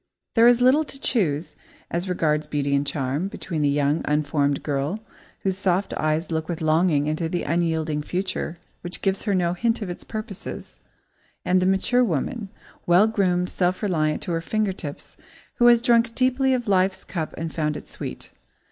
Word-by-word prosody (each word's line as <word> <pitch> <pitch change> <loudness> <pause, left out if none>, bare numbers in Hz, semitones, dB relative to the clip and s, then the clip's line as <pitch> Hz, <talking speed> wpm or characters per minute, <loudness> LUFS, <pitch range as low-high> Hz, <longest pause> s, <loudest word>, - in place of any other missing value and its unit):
There 230 0 +6
is 245 0 +5
little 270 +5 +5
to 275 -2 -7
choose, 160 - 0 0.4
as 175 +2 -2
regards 155 -4 0
beauty 145 -2 -1
and 140 +1 0
charm, 140 +5 -1
between 170 -5 -4
the 145 - +3
young, 145 +2 +1
unformed 145 -1 +1
girl, 145 +7 -1 0.4
whose 190 -1 -1
soft 190 0 0
eyes 155 +2 -1
look 160 0 -2
with 170 - -3
longing 155 -1 +2
into 155 +2 -1
the 175 - -2
unyielding 160 -2 0
future 180 0 -3 0.2
which 175 +1 -6
gives 195 +1 0
her 205 -3 +1
no 175 -2 +1
hint 225 +4 0
of 185 - -4
its 175 - -7
purposes, 215 -3 -7 0.7
and 185 +1 +3
the 185 - +2
mature 215 +6 +3
woman, 200 - -2 0.4
well 175 +4 +6
groomed, 185 -5 +1
self 185 +2 0
reliant 155 -6 0
to - - -3
her 165 -1 0
finger 215 +2 0
tips, 150 -6 -8 0.4
who 240 - +5
has 240 -1 +6
drunk 235 -1 +3
deeply 260 +1 +2
of 245 -2 -4
life's 190 -1 +2
cup 160 -4 -4
and 165 -1 -4
found 150 -2 -1
it - - -10
sweet. 65 - -8
175 Hz, 180 wpm, -24 LUFS, 155-205 Hz, 0.7 s, There